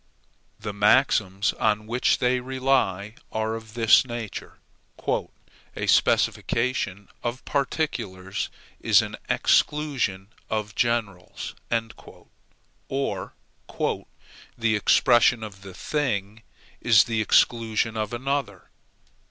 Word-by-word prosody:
The 105 Hz, -, -5 dB
maxims 100 Hz, -2 st, +3 dB
on 105 Hz, -1 st, +1 dB
which 120 Hz, +3 st, +1 dB
they 125 Hz, 0 st, +1 dB
rely 130 Hz, -6 st, 0 dB, 0.2 s
are 110 Hz, 0 st, -1 dB
of 110 Hz, -1 st, -8 dB
this 115 Hz, -2 st, +6 dB
nature: 120 Hz, -4 st, -7 dB, 1.2 s
"A -, -, -3 dB
specification 110 Hz, -5 st, +1 dB
of 120 Hz, +2 st, -4 dB
particulars 115 Hz, -, -2 dB, 0.3 s
is -, -, +4 dB
an -, -, -6 dB
exclusion 130 Hz, -11 st, +1 dB, 0.2 s
of 105 Hz, -2 st, -2 dB
generals"; 110 Hz, -6 st, -2 dB, 1.4 s
or, 135 Hz, -9 st, -3 dB, 1.2 s
"The 115 Hz, -2 st, +1 dB
expression 120 Hz, +2 st, +4 dB
of 100 Hz, -3 st, -9 dB
one 95 Hz, -2 st, -10 dB
thing 110 Hz, -8 st, -2 dB, 0.4 s
is 110 Hz, -4 st, +6 dB
the 115 Hz, -3 st, -1 dB
exclusion 115 Hz, 0 st, +2 dB
of 110 Hz, -1 st, -2 dB
another." 125 Hz, -6 st, -3 dB
110 Hz, 95 wpm, -25 LUFS, 100-125 Hz, 1.4 s, this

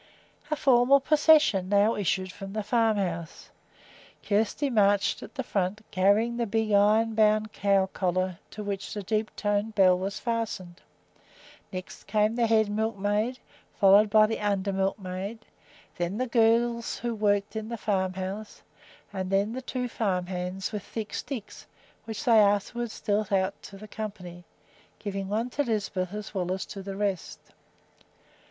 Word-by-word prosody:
A 305 Hz, -, +1 dB
formal 265 Hz, -1 st, +5 dB
procession 295 Hz, -, +4 dB
now 205 Hz, +2 st, +4 dB
issued 190 Hz, -1 st, -1 dB
from 195 Hz, +1 st, -9 dB
the 215 Hz, -1 st, -2 dB
farmhouse. 200 Hz, -7 st, -1 dB, 0.7 s
Kjersti 220 Hz, +7 st, 0 dB
marched 205 Hz, -3 st, +2 dB
at -, -, -11 dB
the 265 Hz, -, -2 dB
front, 200 Hz, -2 st, -2 dB
carrying 205 Hz, +5 st, +2 dB
the 235 Hz, -1 st, -1 dB
big 220 Hz, +1 st, 0 dB
iron 215 Hz, +3 st, +4 dB
bound 215 Hz, 0 st, +2 dB
cow 195 Hz, -1 st, +2 dB
collar 185 Hz, -1 st, -2 dB
to 210 Hz, -, -7 dB
which 200 Hz, 0 st, -4 dB
the 205 Hz, -, -4 dB
deep 215 Hz, +2 st, -1 dB
toned 205 Hz, +1 st, -1 dB
bell 185 Hz, -2 st, +6 dB
was 195 Hz, +3 st, -4 dB
fastened; 225 Hz, -7 st, -3 dB, 0.9 s
next 185 Hz, -2 st, -8 dB
came 215 Hz, +1 st, +2 dB
the 235 Hz, -1 st, +2 dB
head 220 Hz, -1 st, +3 dB
milkmaid, 215 Hz, +2 st, -1 dB, 0.4 s
followed 200 Hz, +2 st, +6 dB
by 215 Hz, +1 st, +6 dB
the 225 Hz, +1 st, -2 dB
under 200 Hz, -1 st, 0 dB
milkmaid; 195 Hz, +2 st, -3 dB, 0.6 s
then 175 Hz, +3 st, -2 dB
the 255 Hz, -, 0 dB
girls 235 Hz, 0 st, +2 dB
who 240 Hz, -1 st, -3 dB
worked 205 Hz, -1 st, 0 dB
in 220 Hz, 0 st, -4 dB
the 235 Hz, -, -4 dB
farmhouse; 190 Hz, 0 st, -3 dB, 0.5 s
and 190 Hz, -1 st, -3 dB
then 200 Hz, +3 st, +1 dB
the 260 Hz, -, -4 dB
two 250 Hz, -1 st, -3 dB
farm 190 Hz, -6 st, -1 dB
hands, 180 Hz, +1 st, -4 dB
with 210 Hz, -2 st, -4 dB
thick 215 Hz, +2 st, -6 dB
sticks, 240 Hz, -7 st, -6 dB, 0.4 s
which 220 Hz, +2 st, -5 dB
they 230 Hz, -3 st, +6 dB
afterwards 210 Hz, +3 st, +1 dB
dealt 205 Hz, -1 st, 0 dB
out 190 Hz, 0 st, +2 dB
to 195 Hz, -, -11 dB
the 215 Hz, +2 st, -11 dB
company, 185 Hz, -5 st, -7 dB, 0.5 s
giving 195 Hz, -2 st, -4 dB
one 225 Hz, +5 st, -2 dB
to 290 Hz, -, -1 dB
Lisbeth 205 Hz, -7 st, -2 dB
as 210 Hz, 0 st, -7 dB
well 180 Hz, -2 st, -2 dB
as 190 Hz, 0 st, -2 dB
to 200 Hz, -, -8 dB
the 195 Hz, 0 st, -6 dB
rest. 200 Hz, -3 st, -2 dB
205 Hz, 155 wpm, -27 LUFS, 195-225 Hz, 0.9 s, bell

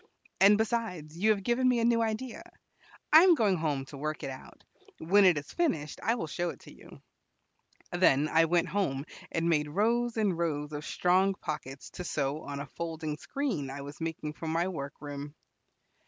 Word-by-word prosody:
"And, 200 Hz, +2 st, +7 dB
besides, 220 Hz, -9 st, -2 dB
you 205 Hz, +6 st, +2 dB
have 205 Hz, -3 st, +2 dB
given 250 Hz, +4 st, +2 dB
me 250 Hz, -, +3 dB
a 230 Hz, -, +2 dB
new 235 Hz, -1 st, +3 dB
idea. 225 Hz, +3 st, -3 dB, 0.7 s
I 315 Hz, -, +11 dB
am 360 Hz, -1 st, +6 dB
going 210 Hz, -8 st, +2 dB
home 145 Hz, -4 st, -1 dB
to 140 Hz, -, -10 dB
work 155 Hz, +1 st, -3 dB
it 135 Hz, -, -3 dB
out. 130 Hz, -, -12 dB, 0.3 s
When 195 Hz, +5 st, +4 dB
it 180 Hz, -4 st, +5 dB
is 145 Hz, -, -6 dB
finished, 160 Hz, -, -1 dB
I 230 Hz, -, +1 dB
will 225 Hz, -, -3 dB
show 175 Hz, +3 st, -2 dB
it -, -, -9 dB
to -, -, -13 dB
you." -, -, -15 dB, 0.9 s
Then 155 Hz, -5 st, +3 dB
I 165 Hz, +1 st, +4 dB
went 170 Hz, +1 st, +1 dB
home, 145 Hz, -9 st, -1 dB, 0.3 s
and 165 Hz, 0 st, 0 dB
made 150 Hz, -3 st, +2 dB
rows 230 Hz, +7 st, +1 dB
and 205 Hz, -5 st, +2 dB
rows 150 Hz, -3 st, -2 dB
of 150 Hz, +1 st, -5 dB
strong 190 Hz, +2 st, +2 dB
pockets 135 Hz, -6 st, -6 dB
to 180 Hz, -, -7 dB
sew 145 Hz, -2 st, -2 dB
on 140 Hz, -2 st, -6 dB
a 140 Hz, -, -4 dB
folding 160 Hz, 0 st, -5 dB
screen 205 Hz, -, -3 dB
I 140 Hz, +1 st, -6 dB
was 145 Hz, +3 st, -9 dB
making 160 Hz, -2 st, -4 dB
for 160 Hz, -, -7 dB
my 165 Hz, +3 st, +1 dB
work 140 Hz, -5 st, -5 dB
room. 145 Hz, 0 st, -7 dB
165 Hz, 195 wpm, -30 LUFS, 150-210 Hz, 0.9 s, I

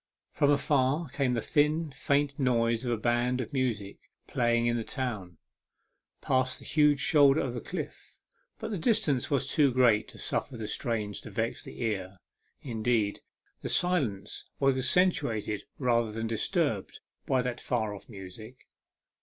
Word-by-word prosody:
From 145 Hz, -, +2 dB
afar 145 Hz, +1 st, +2 dB
came 130 Hz, -2 st, 0 dB
the 115 Hz, -, -2 dB
thin, 155 Hz, +1 st, +1 dB
faint 140 Hz, +1 st, 0 dB
notes 115 Hz, -3 st, +1 dB
of 125 Hz, -, -1 dB
a 120 Hz, -, +1 dB
band 120 Hz, +3 st, +1 dB
of 130 Hz, +3 st, -5 dB
music 115 Hz, -7 st, -2 dB, 0.3 s
playing 120 Hz, -1 st, +1 dB
in 120 Hz, 0 st, +2 dB
the 115 Hz, -, -1 dB
town, 105 Hz, -, -4 dB, 0.8 s
past 130 Hz, -1 st, +1 dB
the -, -, -13 dB
huge 150 Hz, -2 st, +3 dB
shoulder 145 Hz, 0 st, +5 dB
of 125 Hz, -3 st, -4 dB
cliff, -, -, -7 dB, 0.4 s
but -, -, -5 dB
the 200 Hz, -, -2 dB
distance 155 Hz, -, +2 dB
was 140 Hz, -2 st, +1 dB
too 140 Hz, -1 st, +3 dB
great 120 Hz, -4 st, +3 dB
to -, -, -13 dB
suffer 125 Hz, -, -2 dB
the 110 Hz, -2 st, -5 dB
strains 105 Hz, -2 st, -3 dB
to -, -, -9 dB
vex 115 Hz, 0 st, -2 dB
the -, -, -7 dB
ear; 95 Hz, -4 st, -3 dB, 0.5 s
indeed, 110 Hz, -4 st, 0 dB, 0.4 s
the -, -, -4 dB
silence 125 Hz, -, 0 dB
was 135 Hz, -1 st, +3 dB
accen 180 Hz, +8 st, +4 dB
tuated 110 Hz, -, -3 dB, 0.2 s
rather 120 Hz, -4 st, +1 dB
than 115 Hz, +1 st, -3 dB
disturbed 115 Hz, -1 st, -1 dB, 0.3 s
by 130 Hz, -1 st, +2 dB
that 125 Hz, -1 st, -4 dB
far 110 Hz, -4 st, -1 dB
off 100 Hz, -, -11 dB
music. 110 Hz, +4 st, -11 dB
125 Hz, 155 wpm, -29 LUFS, 110-140 Hz, 0.8 s, shoulder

